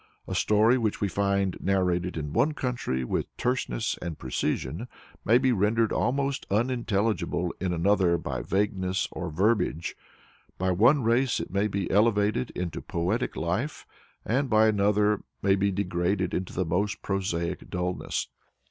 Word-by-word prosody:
A -, -, -4 dB
story 110 Hz, +4 st, +3 dB
which 110 Hz, -3 st, -1 dB
we 100 Hz, -, +1 dB
find 100 Hz, -1 st, 0 dB
narrated 90 Hz, -2 st, 0 dB
in 75 Hz, -1 st, -4 dB
one 150 Hz, -, +2 dB
country 120 Hz, -, -2 dB
with -, -, -2 dB
terseness 125 Hz, -3 st, -1 dB
and 85 Hz, -3 st, -5 dB
precision 65 Hz, -, -2 dB, 0.4 s
may 115 Hz, +3 st, +5 dB
be 130 Hz, 0 st, +2 dB
rendered 110 Hz, +1 st, +2 dB
almost 140 Hz, +2 st, 0 dB
unintelligible 105 Hz, -6 st, 0 dB
in 95 Hz, -1 st, -1 dB
another 90 Hz, 0 st, +3 dB
by -, -, -4 dB
vagueness 95 Hz, -2 st, 0 dB
or 90 Hz, -2 st, -4 dB
verbiage; 90 Hz, -1 st, 0 dB, 0.6 s
by 95 Hz, 0 st, 0 dB
one 120 Hz, +10 st, +4 dB
race 120 Hz, +3 st, +2 dB
it 85 Hz, -, -5 dB
may 100 Hz, +2 st, +1 dB
be 100 Hz, -3 st, -2 dB
elevated 105 Hz, -, +2 dB
into 90 Hz, -3 st, -3 dB
poetic 95 Hz, +9 st, -1 dB
life, 95 Hz, -, -2 dB, 0.4 s
by 110 Hz, -3 st, +3 dB
another 105 Hz, 0 st, +3 dB
it 105 Hz, -, -5 dB, 0.2 s
may 95 Hz, 0 st, +4 dB
be 100 Hz, +1 st, +1 dB
degraded 90 Hz, 0 st, -1 dB
into 90 Hz, 0 st, -2 dB
the 95 Hz, -, -1 dB
most 95 Hz, +5 st, -1 dB
prosaic 90 Hz, -4 st, -2 dB
dulness. 90 Hz, 0 st, -2 dB
100 Hz, 145 wpm, -27 LUFS, 90-110 Hz, 0.6 s, may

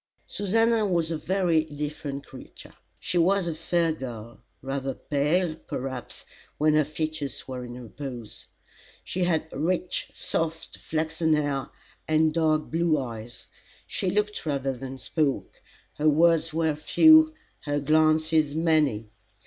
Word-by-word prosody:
Susannah 225 Hz, +3 st, +2 dB
was 170 Hz, -3 st, 0 dB
a -, -, 0 dB
very 175 Hz, -2 st, +2 dB
different 145 Hz, -2 st, -5 dB
creature. -, -, -13 dB, 0.3 s
She 175 Hz, -, -1 dB
was 190 Hz, +2 st, +3 dB
a 170 Hz, -, -2 dB
fair 165 Hz, +1 st, 0 dB
girl 120 Hz, -5 st, -8 dB, 0.2 s
rather 135 Hz, -1 st, -3 dB
pale, 155 Hz, +4 st, 0 dB
perhaps, 130 Hz, -3 st, -6 dB, 0.3 s
when 155 Hz, +1 st, +3 dB
her 155 Hz, -1 st, +4 dB
features 155 Hz, -2 st, -4 dB
were 130 Hz, -1 st, -5 dB
in 120 Hz, 0 st, -8 dB
repose. 120 Hz, -2 st, -8 dB, 0.6 s
She 180 Hz, 0 st, -1 dB
had 160 Hz, -2 st, 0 dB
rich 175 Hz, +4 st, -1 dB
soft 165 Hz, 0 st, -3 dB
flaxen 160 Hz, 0 st, 0 dB
hair, 145 Hz, -3 st, -1 dB, 0.4 s
and 155 Hz, 0 st, +3 dB
dark 155 Hz, -2 st, +1 dB
blue 165 Hz, -1 st, +2 dB
eyes. 120 Hz, -2 st, -7 dB, 0.4 s
She 185 Hz, -, -2 dB
looked 210 Hz, +2 st, -1 dB
rather 140 Hz, -3 st, -1 dB
than 135 Hz, +1 st, -7 dB
spoke. 145 Hz, +1 st, -2 dB, 0.4 s
Her 155 Hz, +1 st, +4 dB
words 165 Hz, +1 st, +3 dB
were 160 Hz, -1 st, +1 dB
few, 315 Hz, -, +6 dB, 0.3 s
her 145 Hz, 0 st, 0 dB
glances 155 Hz, 0 st, +3 dB
many. 150 Hz, -10 st, +1 dB
155 Hz, 130 wpm, -26 LUFS, 140-165 Hz, 0.6 s, few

